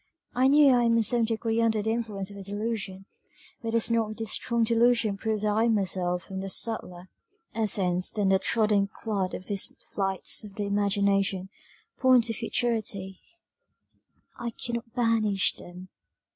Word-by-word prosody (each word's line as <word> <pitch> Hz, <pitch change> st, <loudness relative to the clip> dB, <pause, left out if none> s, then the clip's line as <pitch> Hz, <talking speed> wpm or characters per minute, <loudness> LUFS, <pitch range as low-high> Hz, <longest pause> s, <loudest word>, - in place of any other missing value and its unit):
I 255 Hz, +2 st, +3 dB
knew 285 Hz, -1 st, +6 dB
I 245 Hz, -, +3 dB
am 230 Hz, 0 st, +3 dB
in 230 Hz, -, +3 dB
some 235 Hz, 0 st, +3 dB
degree 225 Hz, 0 st, -1 dB
under 220 Hz, -2 st, +1 dB
the 220 Hz, -, 0 dB
influence 210 Hz, -4 st, -3 dB
of 200 Hz, -, -10 dB
a -, -, -8 dB
delusion 205 Hz, -1 st, -4 dB, 0.6 s
but 230 Hz, -, -4 dB
does 230 Hz, 0 st, +2 dB
not 220 Hz, -2 st, 0 dB
this 225 Hz, -3 st, 0 dB
strong 235 Hz, -1 st, +2 dB
delusion 230 Hz, -2 st, +2 dB
prove 215 Hz, +1 st, -2 dB
that 210 Hz, 0 st, +1 dB
I 220 Hz, +3 st, +2 dB
myself 185 Hz, -4 st, -1 dB
'am 190 Hz, 0 st, -4 dB
of 195 Hz, 0 st, -4 dB
subtiler 185 Hz, -6 st, -2 dB, 0.5 s
essence 185 Hz, -5 st, 0 dB
than 205 Hz, -3 st, 0 dB
the 190 Hz, 0 st, +4 dB
trodden 210 Hz, -1 st, +1 dB
clod' 200 Hz, -2 st, -3 dB
these 200 Hz, 0 st, 0 dB, 0.2 s
flights 195 Hz, +2 st, -2 dB
of 205 Hz, -2 st, -11 dB
the 210 Hz, -, -3 dB
imagination 200 Hz, -1 st, 0 dB, 0.5 s
point 255 Hz, -2 st, +5 dB
to 225 Hz, 0 st, -2 dB
futurity; 220 Hz, -5 st, -2 dB, 1.2 s
I 235 Hz, -, -3 dB
cannot 235 Hz, 0 st, -5 dB
banish 220 Hz, -5 st, +2 dB
them. 180 Hz, +1 st, -12 dB
215 Hz, 160 wpm, -27 LUFS, 195-230 Hz, 1.2 s, knew